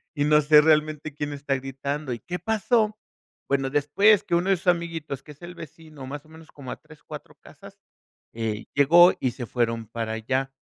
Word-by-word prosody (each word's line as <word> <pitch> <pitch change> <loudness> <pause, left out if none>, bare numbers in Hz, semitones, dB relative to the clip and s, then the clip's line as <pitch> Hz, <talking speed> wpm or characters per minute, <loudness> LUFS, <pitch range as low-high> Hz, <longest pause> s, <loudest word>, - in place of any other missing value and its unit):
y 145 - 0
no 150 0 +5
sé, 150 0 +6
realmente 155 -1 +1
quién 145 0 -4
está 140 -1 -2
gritando: 135 +1 -4
"Y, 120 - -6
¿qué 180 +6 -6
pasó?" 220 0 +1 0.5
Bueno, 135 -1 0
después 180 +9 +3
que 170 - -1
uno 180 +3 0
de 190 - +3
sus 180 - -14
amiguitos, 165 -6 -1
que 150 - -13
es 145 - -28
el 175 +1 -9
vecino 155 -3 -11
más 145 +2 -7
o - - -21
menos 160 0 -15
como 130 -3 -9
a - - -6
3 - - -18
4 - - -10
casas, - - -15 0.5
eh, 110 -1 -4
llegó 170 +6 +6
y 130 - 0
se 120 0 -7
fueron 115 -1 -2
para 115 0 -4
allá, 130 +4 -2
145 Hz, 200 wpm, -25 LUFS, 135-165 Hz, 0.5 s, sé